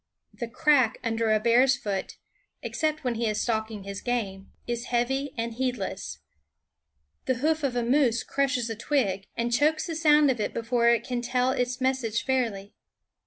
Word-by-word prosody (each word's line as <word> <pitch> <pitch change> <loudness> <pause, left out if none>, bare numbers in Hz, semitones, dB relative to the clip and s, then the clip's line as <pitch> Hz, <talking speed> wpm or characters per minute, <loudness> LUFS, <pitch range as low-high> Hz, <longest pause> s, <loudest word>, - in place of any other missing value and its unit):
The 235 - -5
crack 255 -2 +3
under 225 -1 0
a 215 - +4
bear's 250 +4 +4
foot, 200 -7 -4 0.5
except 310 -1 -1
when 250 -2 0
he 230 0 -1
is 215 0 -1
stalking 220 -3 -2
his 200 0 -6
game, 200 -6 -3
is 240 0 -3
heavy 265 +3 0
and 230 0 -2
heedless. 225 - -3 1.0
The 260 - +1
hoof 310 +5 0
of 265 -3 0
a 240 - +1
moose 240 -2 +2
crushes 260 -4 0
a - - -3
twig, 210 -6 -1
and 235 0 -1
chokes 305 +5 +2
the 340 - -4
sound 300 -3 +5
of 245 - -3
it 210 - -2
THE - - -1
WOODS - - -16
before 235 -1 +4
it 235 -1 +3
can 245 -1 -3
tell 250 +1 +1
its 250 -1 -1
message 260 -4 0
fairly. 225 -7 -1
240 Hz, 180 wpm, -27 LUFS, 225-265 Hz, 1.0 s, sound